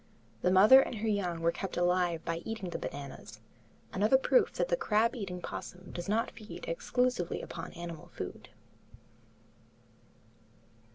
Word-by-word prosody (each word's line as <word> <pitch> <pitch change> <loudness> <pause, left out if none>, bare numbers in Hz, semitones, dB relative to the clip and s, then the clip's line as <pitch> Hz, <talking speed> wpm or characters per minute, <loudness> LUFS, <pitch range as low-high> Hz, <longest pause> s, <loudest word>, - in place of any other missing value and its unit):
The 180 - +3
mother 210 +8 +8
and 255 - -3
young 200 -6 -1
were 165 0 +3
kept 195 +2 -5
alive 175 -2 +1
by 165 0 -1
eating 195 0 -5
the - - -3
bananas, 140 -5 -7 0.5
another 210 +7 +4
proof 445 - +3
that - - -1
the - - +3
crab 230 - +2
eating 195 -6 -4
opossum 180 +1 -7
does 175 +2 -6
not 220 +2 +1
feed 215 -1 -9
exclusively 250 - 0
upon 165 - -7
animal 170 -2 -7
food. - - -7
190 Hz, 135 wpm, -31 LUFS, 175-230 Hz, 0.5 s, mother